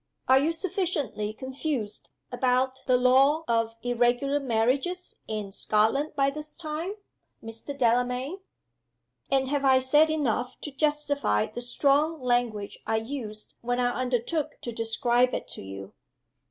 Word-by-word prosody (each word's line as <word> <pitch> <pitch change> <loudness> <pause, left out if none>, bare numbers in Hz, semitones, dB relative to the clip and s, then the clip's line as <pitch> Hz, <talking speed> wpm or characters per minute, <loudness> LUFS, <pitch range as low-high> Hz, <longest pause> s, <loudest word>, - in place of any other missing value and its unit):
Are 260 +1 +6
you 300 +4 +2
sufficiently 325 - -2
confused 260 -2 -4 0.2
about 260 0 +1
the 255 -1 +5
law 270 +5 +4
of 230 -1 +1
Irregular 245 +4 +2
Marriages 270 +8 0
in 210 -2 -4
Scotland 220 +9 +1
by 275 -1 +2
this 300 +1 -8
time, 325 +3 -4 0.5
Mr. 225 +5 -6
Delamayn? 250 +7 +1 0.9
And 265 -1 +2
have 285 0 0
I 265 -1 +6
said 295 +5 +4
enough 250 -5 -1
to 295 - -6
justify 285 - +1
the 240 - -7
strong 285 +6 +2
language 240 -5 -1
I 225 - +1
used 220 -2 -5
when 245 +1 -1
I 245 0 +2
undertook 255 +5 -1
to 240 - -4
describe 235 +2 +1
it - - -5
to - - -4
you?" 95 0 -8
255 Hz, 135 wpm, -27 LUFS, 235-290 Hz, 0.9 s, Are